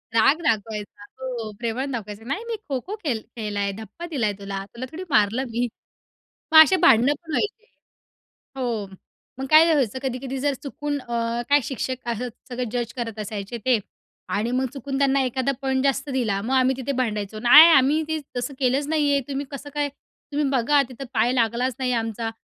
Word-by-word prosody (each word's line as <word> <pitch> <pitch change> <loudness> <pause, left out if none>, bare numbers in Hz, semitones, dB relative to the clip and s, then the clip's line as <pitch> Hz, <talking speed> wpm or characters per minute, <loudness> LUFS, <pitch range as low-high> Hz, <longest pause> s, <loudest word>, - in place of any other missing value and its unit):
राग 270 +7 +5
दाखवायचा 210 -4 -2 0.2
हो, 240 -4 -4
प्रेमाने 250 +4 -2
दाखवायचं. 215 -2 -6
"नाही 385 +12 -2
मी 460 - -2
खो-खो 280 - -3
खेल 235 -8 -1 0.2
खेळलाय, 205 -2 -2
धप्पा 220 - -8
दिलाय 225 -8 0
तुला, 195 -1 -5
तुला 245 +2 -5
थोडी 355 +4 -6
मारलं 220 +2 +3
मी." 240 +2 -1 0.9
मग 315 - +9
अशी 345 +5 +7
भांडणं 245 +6 +6
पण 325 - -12
व्हायचे. 430 +6 -1 0.9
हो. 235 -5 -2 0.5
मग 270 - -2
काय 320 +2 +7
व्हायचं 260 -5 +1
कधी-कधी 265 +1 -3
जर 285 +1 +1
चुकून 290 +1 -3
अ, 235 -1 -2
काय 290 0 +5
शिक्षक 255 0 -4
असं 240 +2 -2 0.2
सगळं 245 -2 -3
जज 240 -1 -3
करत 225 -3 -4
असायचे 210 +2 -5
ते 250 -4 +4 0.5
आणि 225 +4 0
मग 260 +1 +1
चुकून 270 0 -4
त्यांना 275 -1 +3
एखादा 260 +2 0
पॉईंट 265 0 0
जास्त 275 +1 0
दिला 220 -7 0
मग 250 +5 -2
आम्ही 260 0 +3
तिथे 265 +1 -3
भांडायचो 215 -3 -2
"नाही 300 +8 +9
आम्ही 290 +1 +5
ते 315 0 -1 0.2
तसं 275 +3 -3
केलंच 270 +3 +1
नाही 300 -2 +2
आहे 280 -1 +2
तुम्ही 275 +1 -3
कसं 280 +1 -7
काय, 290 -1 0
तुम्ही 285 +1 -6
बघा 275 +2 +3
तिथं 260 +2 -8
पाय 230 +2 +2
लागलाच 240 +1 +1
नाही 255 -1 0
आमचा." 225 0 -3
255 Hz, 180 wpm, -24 LUFS, 225-280 Hz, 0.9 s, मग